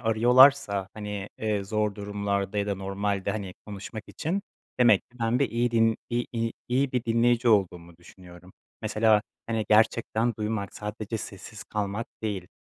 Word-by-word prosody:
arıyorlarsa, 115 -3 +5
hani, 105 -1 -5
eee, 105 -2 -1
zor 105 0 -1
durumlarda 100 0 -2
ya 100 - 0
da 100 - 0
normalde, 100 +1 -2
hani, 100 -3 -5
konuşmak 105 +1 -7
için 180 +6 -2 0.4
demek 115 -5 +6
ki 125 - -21
ben 115 +2 +1
bir 140 - +1
iyi 120 +1 +1
din 115 -1 +3
iy 120 +1 0
iy 115 -1 -1 0.2
iyi 130 +2 +1
bir 125 -2 -1
dinleyici 120 +1 +2
olduğumu 90 -5 +1
düşünüyorum. 90 0 -15 0.3
Mesela, 110 -1 +3 0.2
hani, 110 -1 -1
gerçekten 110 +1 +3
duymak, 105 -2 -3
sadece 105 +1 -5
sessiz 105 +2 -9
kalmak 105 +2 -3 0.2
değil, 100 -5 -3
105 Hz, 150 wpm, -27 LUFS, 100-115 Hz, 0.4 s, demek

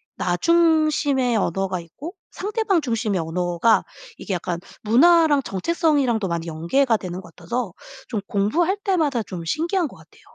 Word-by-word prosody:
나 175 0 -1
중심의 310 - +2
언어가 190 -1 -1
있고 175 - -9 0.2
상대방 410 -3 0
중심의 225 -7 -1
언어가 175 +6 +1 0.3
이게 195 - -5
약간 175 -1 -3 0.2
문화랑 295 +5 +5
정체성이랑도 265 - +1
많이 170 -1 -3
연계가 220 - +1
되는 185 -2 -6
것 175 -3 -16
같아서 235 -6 -4 0.3
좀 220 -4 -3
공부할 320 - +1
때마다 310 - +1
좀 180 -4 -7
신기한 335 - 0
것 - - -14
같아요. - - -20
235 Hz, 330 characters per minute, -22 LUFS, -, 0.3 s, 문화랑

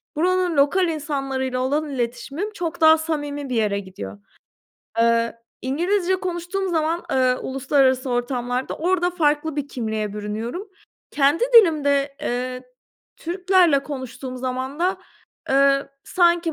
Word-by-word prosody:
buranın 360 0 +1
lokal 350 +7 +3
insanlarıyla 275 -5 -2
olan 290 +4 0
iletişimim 270 - -3
çok 340 -4 -4
daha 320 0 +7
samimi 290 -3 -3
bir 250 - -2
yere 210 -3 +1
gidiyor. 100 - -9 0.8
Eee, 230 0 +2 0.3
İngilizce 350 +8 +1
konuştuğum 360 +2 -3
zaman, 330 0 0
eee, 255 -1 +3
uluslararası 265 -1 +1
ortamlarda 245 +1 -2
orada 355 +1 +1
farklı 305 -3 0
bir 285 -1 -3
kimliğe 220 -5 -3
bürünüyorum. 220 - -5 0.4
Kendi 285 +8 +3
dilimde, 285 -9 +5
eee, 250 +1 -3 0.5
Türklerle 355 -4 +2
konuştuğum 260 -2 -6
zaman 260 +2 -4
da, 370 +2 +1 0.5
eee, 275 0 +3 0.2
sanki 345 -2 +2
280 Hz, 115 wpm, -22 LUFS, 255-340 Hz, 0.8 s, daha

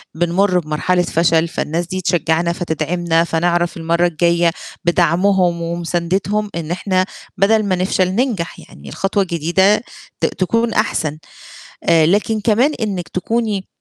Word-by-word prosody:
بنمُر 180 +3 +2
بمرحلة 170 +3 0
فشل، 165 -1 +2
فالناس 170 +1 -2
دي 185 +1 -4
تشجّعنا، 170 -1 +1
فتدعمنا، 165 0 0
فنعرف 175 +1 0
المرّة 170 +1 +1
الجاية 170 0 +2 0.3
بدعمهم 175 +1 +2
ومُساندتهم، 175 +5 -1
إن 165 -1 -4
إحنا 185 0 0 0.3
بدل 215 +2 +3
ما 190 -2 +1
نفشل 185 0 +1
ننجح، 210 -3 -2
يعني 70 -1 -13
الخطوة 195 - 0
الجديدة 175 +4 +2 0.4
ت - - +1
تكون 230 +5 0
أحسن 155 -8 0 0.7
آآ 160 -2 +4
لكن 210 +5 +1
كمان 235 +8 +2
إنِّك 195 -5 -2
تكوني 210 0 -2
175 Hz, 125 wpm, -18 LUFS, 170-195 Hz, 0.7 s, آآ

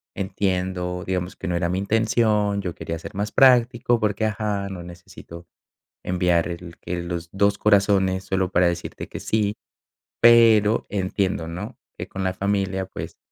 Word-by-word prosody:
entiendo, 90 -2 -2
digamos 90 -1 -3
que 95 - -7
no 90 - -1
era 85 0 0
mi 90 - -1
intención, 105 0 +1
yo 90 -3 -4
quería 85 0 -5
ser 90 - -9
más 105 +1 -2
práctico, 120 -2 +4
porque, 105 0 0
ajá, 105 -2 -2
no 95 -2 -7
necesito 85 0 -12 0.6
enviar 90 -2 +1
el 85 -1 -8
que 90 0 -4
los 85 -1 -5
dos 100 +1 +2
corazones 100 -2 +3
solo 95 -1 -1
para 90 0 +4
decirte 85 0 -5
que - - -7
sí. 105 -1 0 0.7
Pero 115 -2 +6
entiendo, 95 -3 -1
¿no? 105 +9 -7 0.2
Que - - -6
con 95 - -5
la 95 -1 0
familia, 95 -1 -1
pues, - - -8
95 Hz, 160 wpm, -23 LUFS, 90-105 Hz, 0.7 s, Pero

